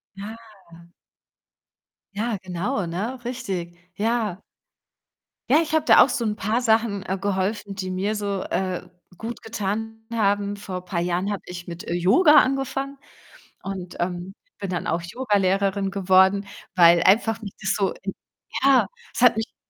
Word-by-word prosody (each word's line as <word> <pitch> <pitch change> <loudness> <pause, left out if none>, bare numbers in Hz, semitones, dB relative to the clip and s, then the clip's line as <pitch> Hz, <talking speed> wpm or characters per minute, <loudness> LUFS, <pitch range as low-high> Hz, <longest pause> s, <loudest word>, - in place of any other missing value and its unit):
Ja. 205 +3 -7 1.8
Ja, 220 +1 -1
genau, 185 +4 -2
ne, 220 +9 -4
richtig. 190 -9 -4 0.2
Ja. 215 -3 -1 1.1
Ja, 295 +4 +6
ich 320 -1 -4
habe 315 -1 +2
da - - +8
auch - - 0
so 235 -1 -1
'n 210 -1 0
paar 220 +4 0
Sachen, 220 -4 +2
äh, 190 +1 -2
geholfen, 200 +1 -2
die 185 -1 -4
mir 200 +4 -1
so, 200 -2 -2
äh, 185 -2 -2 0.3
gut 230 +1 -6
getan 225 +1 -4
haben. 205 -2 +1
Vor 185 -3 -6
paar 175 -2 -2
Jahren 180 +3 -1
habe 200 - -3
ich 175 -1 -8
mit, 170 0 -7
äh, 170 - -2
Yoga 205 - +5
angefangen 270 +1 +1 0.7
und, 185 -2 -6
ähm, 180 +2 -3 0.3
bin 195 - -4
dann 175 -2 -3
auch 170 +1 0
Yogalehrerin 195 -2 +1
geworden, 190 +1 +4 0.3
weil 170 -1 +7
einfach 225 +3 +3
mich 200 -3 -7
das 195 +2 +1
so 195 -4 0 0.7
ja, 275 -2 +6 0.3
es - - -3
hat 240 -3 +6
mich 225 - -6
200 Hz, 150 wpm, -24 LUFS, 185-225 Hz, 1.8 s, da